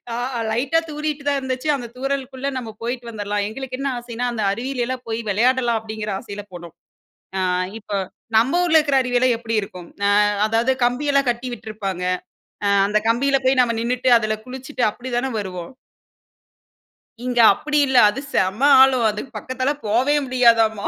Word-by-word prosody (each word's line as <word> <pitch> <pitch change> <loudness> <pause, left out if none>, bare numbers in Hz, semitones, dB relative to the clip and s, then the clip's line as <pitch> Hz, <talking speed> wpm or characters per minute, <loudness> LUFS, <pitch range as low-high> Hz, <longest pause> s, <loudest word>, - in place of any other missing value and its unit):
ஆ - - -3 0.4
லைட்டா 260 +8 +1
தூறிட்டு 300 -1 -3
தான் 280 - +1
இருந்துச்சு. 260 +2 -3
அந்த 245 -3 -6
தூறலுக்குள்ள 270 0 -3
நம்ம 230 -3 -6
போயிட்டு 240 0 -4
வந்திர்லாம். 205 -1 -2
எங்களுக்கு 255 +2 -6
என்ன 275 0 -1
ஆசையின்னா, 240 0 -4
அந்த 220 -3 -3
அருவியிலல்லாம் 250 +2 -3
போய் 225 +1 -2
விளையாடலாம் 240 +2 +2
அப்பிடிங்கிற 215 -1 -5
ஆசையில 205 0 -8
போனோம். 170 -1 -10 0.6
ஆ - - 0 0.4
இப்ப 205 -1 -9 0.4
நம்ம 270 +10 +3
ஊர்ல 325 -2 +4
இருக்கிற 285 -3 +1
அருவி 250 -1 0
எல்லாம் 250 -1 +3
எப்பிடி 230 -1 -3
இருக்கும்? 180 -3 -9 0.2
ஆ - - +3 0.4
அதாவது 230 +4 +1
கம்பியெல்லாம் 275 +1 +1
கட்டி 240 +2 -2
விட்டுருப்பாங்க. 205 -6 -5 0.6
அ - - +3 0.2
அந்த 210 +1 +2
கம்பியில 275 +4 +2
போய் 260 -1 +4
நம்ம 235 -1 0
நின்னுட்டு 250 +2 0
அதில 215 -1 -1
குளிச்சுட்டு 260 +1 -6
அப்பிடி 245 +4 -9
தான 265 +2 -1
வருவோம். 185 +2 -7 1.5
இங்க 250 -1 -1
அப்பிடி 300 +4 -1
இல்ல. 260 -1 +2
அது 265 - -4
செம்ம 190 +7 0 0.2
ஆழம். 260 -3 +4
அதுக்கு 210 +6 -7
பக்கத்தில 260 +2 -2 0.2
போவே 255 +7 +2
முடியாதாம்மா! 230 -4 +3
245 Hz, 160 wpm, -21 LUFS, 220-265 Hz, 1.5 s, ஊர்ல